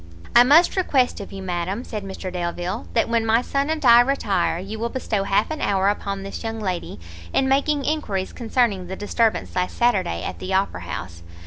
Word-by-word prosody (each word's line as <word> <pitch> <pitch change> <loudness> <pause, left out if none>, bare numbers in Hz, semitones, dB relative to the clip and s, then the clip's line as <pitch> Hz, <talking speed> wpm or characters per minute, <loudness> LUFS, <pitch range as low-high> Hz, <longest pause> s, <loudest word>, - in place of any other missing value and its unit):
"I 240 - +10
must 305 +7 +5
request 275 -12 +1
of 200 - -8
you, 195 -1 -7
madam," 185 +5 -3
said 215 -5 -6
Mr 190 -1 -6
Delvile, 175 - -3
"that - - +3
when 230 -1 +1
my 225 +2 +2
son 280 +3 -1
and 315 -2 -2
I 235 0 +8
retire, 245 -9 0
you 200 +5 -6
will 235 +1 -1
bestow 215 -5 -2
half 200 +7 +1
an 310 - -4
hour 195 0 +2
upon 200 -1 -3
this 195 - -7
young 225 0 -4
lady, 185 - -4 0.3
in 265 - +2
making 280 +1 +1
enquiries 210 -12 -2
concerning 225 -6 0
the 190 - -5
disturbance 220 +3 0
last 180 0 -1
Saturday 190 - +1
at 90 -2 -5
the 190 0 -2
Opera 190 - 0
house. 85 -1 -7
205 Hz, 200 wpm, -22 LUFS, 190-245 Hz, 0.3 s, I